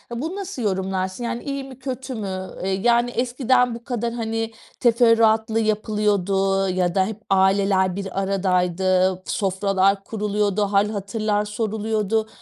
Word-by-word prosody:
Bunu 320 Hz, +10 st, -4 dB
nasıl 390 Hz, -9 st, -5 dB
yorumlarsın, 190 Hz, +1 st, -2 dB
yani, 235 Hz, 0 st, -3 dB
iyi 275 Hz, -1 st, -3 dB
mi, 265 Hz, -1 st, -11 dB
kötü 260 Hz, -1 st, -5 dB
mü? 190 Hz, -3 st, -4 dB
Iıı, -, -, -2 dB
yani, 240 Hz, +1 st, +3 dB
eskiden 245 Hz, 0 st, +1 dB
bu 235 Hz, -, -10 dB
kadar, 235 Hz, -2 st, -3 dB
hani, 225 Hz, -1 st, -2 dB, 0.3 s
teferruatlı 225 Hz, -2 st, +4 dB
yapılıyordu 200 Hz, -3 st, +1 dB
ya 180 Hz, -1 st, 0 dB
da 190 Hz, -1 st, +3 dB
hep 220 Hz, +1 st, -6 dB
aileler 190 Hz, -1 st, +3 dB
bir 195 Hz, -1 st, -4 dB
aradaydı, 185 Hz, -1 st, +1 dB
sofralar 195 Hz, -1 st, +1 dB
kuruluyordu, 210 Hz, -1 st, -1 dB
hâl 200 Hz, +1 st, +2 dB
hatırlar 210 Hz, 0 st, -1 dB
soruluyordu 220 Hz, 0 st, -1 dB
210 Hz, 130 wpm, -22 LUFS, 195-235 Hz, 0.3 s, teferruatlı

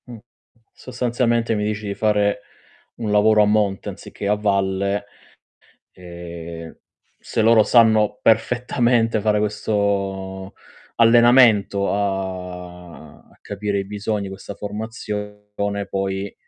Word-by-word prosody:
Mh. 120 Hz, -1 st, -9 dB, 0.6 s
Sostanzialmente, 120 Hz, -2 st, -1 dB
mi 105 Hz, -, -1 dB
dici 105 Hz, 0 st, -3 dB
di 100 Hz, -, -2 dB
fare 105 Hz, -1 st, +1 dB, 0.5 s
un 110 Hz, -3 st, -4 dB
lavoro 105 Hz, +1 st, +4 dB
a -, -, +3 dB
monte 105 Hz, -2 st, 0 dB
anziché 100 Hz, -, -7 dB
a 105 Hz, -, +3 dB
valle. 100 Hz, -1 st, 0 dB, 0.9 s
Ehm, 85 Hz, -2 st, -9 dB, 0.4 s
se 110 Hz, -, -2 dB
loro 110 Hz, 0 st, +6 dB
sanno 110 Hz, -3 st, +4 dB
perfettamente 120 Hz, 0 st, +2 dB
fare 105 Hz, 0 st, +1 dB
questo 100 Hz, -2 st, -2 dB, 0.4 s
allenamento 115 Hz, -4 st, +5 dB
a 90 Hz, -4 st, -6 dB
capire 100 Hz, 0 st, -3 dB
i 100 Hz, -, -2 dB
bisogni, 105 Hz, 0 st, -3 dB
questa 95 Hz, +1 st, -9 dB
formazione, 105 Hz, -1 st, -5 dB
poi 95 Hz, 0 st, -3 dB
105 Hz, 100 wpm, -21 LUFS, 95-110 Hz, 0.9 s, loro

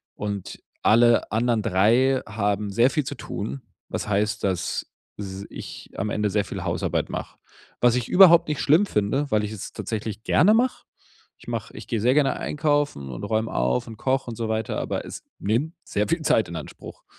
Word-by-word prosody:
und 100 Hz, -2 st, -5 dB, 0.2 s
alle 120 Hz, +1 st, +4 dB
anderen 115 Hz, 0 st, +1 dB
3 115 Hz, +6 st, +3 dB
haben 105 Hz, 0 st, -1 dB
sehr 115 Hz, +6 st, +4 dB
viel 150 Hz, +2 st, 0 dB
zu 145 Hz, -, -4 dB
tun, 125 Hz, +4 st, -5 dB, 0.3 s
was -, -, -4 dB
heißt, 105 Hz, +1 st, 0 dB
dass 95 Hz, -3 st, -1 dB, 0.3 s
s 95 Hz, -1 st, -6 dB
ich -, -, -9 dB
am 100 Hz, +2 st, -1 dB
Ende 105 Hz, 0 st, 0 dB
sehr 100 Hz, 0 st, 0 dB
viel -, -, -6 dB
Hausarbeit -, -, -1 dB
mache. -, -, -6 dB, 0.4 s
Was 120 Hz, -1 st, +5 dB
ich 125 Hz, -2 st, -1 dB
überhaupt 180 Hz, -3 st, +7 dB
nicht 150 Hz, -1 st, -2 dB
schlimm 160 Hz, +8 st, +4 dB
finde, 135 Hz, -, 0 dB
weil 105 Hz, -1 st, +2 dB
ich 105 Hz, -, -3 dB
es 110 Hz, -3 st, -7 dB
tatsächlich 110 Hz, -1 st, -5 dB
gerne 190 Hz, +8 st, +4 dB
mache. 245 Hz, +3 st, +1 dB, 0.5 s
Ich -, -, -19 dB
mache -, -, -4 dB
ich -, -, -9 dB
gehe 115 Hz, -3 st, -1 dB
sehr 125 Hz, +3 st, +4 dB
gerne 145 Hz, -1 st, +2 dB
einkaufen 145 Hz, -, 0 dB
und -, -, -7 dB
räume 110 Hz, 0 st, -1 dB
auf 60 Hz, -, 0 dB
und 110 Hz, -, -9 dB
koche 130 Hz, +2 st, 0 dB
und -, -, -6 dB
so 115 Hz, -, -2 dB
weiter, 110 Hz, 0 st, -1 dB
aber -, -, -3 dB
es -, -, -8 dB, 0.2 s
nimmt 120 Hz, -, 0 dB
sehr 105 Hz, -8 st, -1 dB
viel 165 Hz, 0 st, 0 dB
Zeit 115 Hz, -7 st, +2 dB
in 85 Hz, -, -7 dB
Anspruch. 80 Hz, -, -9 dB
110 Hz, 190 wpm, -24 LUFS, 105-135 Hz, 0.5 s, überhaupt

